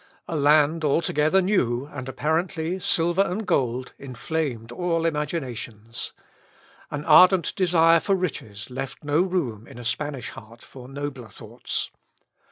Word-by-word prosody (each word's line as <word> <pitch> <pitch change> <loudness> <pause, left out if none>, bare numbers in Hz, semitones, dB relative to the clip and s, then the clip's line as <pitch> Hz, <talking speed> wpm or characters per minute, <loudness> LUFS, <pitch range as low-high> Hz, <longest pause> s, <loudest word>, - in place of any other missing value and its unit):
A 165 - -3
land 150 +2 +4
altogether 155 +4 +2
new, 130 - +1
and 135 -2 -6
apparently 160 +5 -1
silver 175 +1 +2
and 200 +3 -1
gold, 125 -5 0
inflamed 130 -2 -4
all 165 +2 -1
imaginations. 130 -8 -4 0.8
An 150 +1 -5
ardent 185 -1 +6
desire 165 -2 +4
for 195 +5 +1
riches 125 - -4
left 130 -1 -6
no 150 +3 +2
room 145 - -2
in - - -12
a 120 - -9
Spanish 140 +1 -3
heart 115 +2 -13
for 125 -2 -12
nobler 135 -4 -6
thoughts. 100 - -5
150 Hz, 130 wpm, -24 LUFS, 125-170 Hz, 0.8 s, ardent